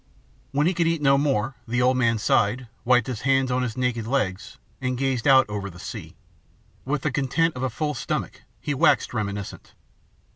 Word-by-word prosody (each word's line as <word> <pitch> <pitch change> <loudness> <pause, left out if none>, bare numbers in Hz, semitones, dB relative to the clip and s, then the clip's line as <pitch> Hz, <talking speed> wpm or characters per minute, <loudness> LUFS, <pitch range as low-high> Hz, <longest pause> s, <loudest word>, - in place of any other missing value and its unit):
When 145 +2 +1
he 180 - +3
could 170 -1 +1
eat 165 -1 +1
no 135 0 +5
more, 135 -3 0
the 120 +2 0
old 130 +1 +4
man 115 -3 +2
sighed, 110 +3 +1 0.2
wiped 125 -1 +4
his 125 -5 -5
hands 135 -1 +2
on 125 +1 +1
his 125 -2 -3
naked 120 -3 -1
legs, 105 -8 -2 0.2
and 130 -1 -1
gazed 135 -1 0
out 135 -1 +7
over 100 -2 -4
the 90 - -13
sea. - - -8 0.7
With 140 +1 -1
the 150 - 0
content 140 +5 +1
of 125 - -5
a 130 - 0
full 150 +6 -2
stomach, 125 - -4 0.2
he 145 - -2
waxed 135 - +3
reminiscent. 100 -3 -5
130 Hz, 190 wpm, -24 LUFS, 115-135 Hz, 0.7 s, out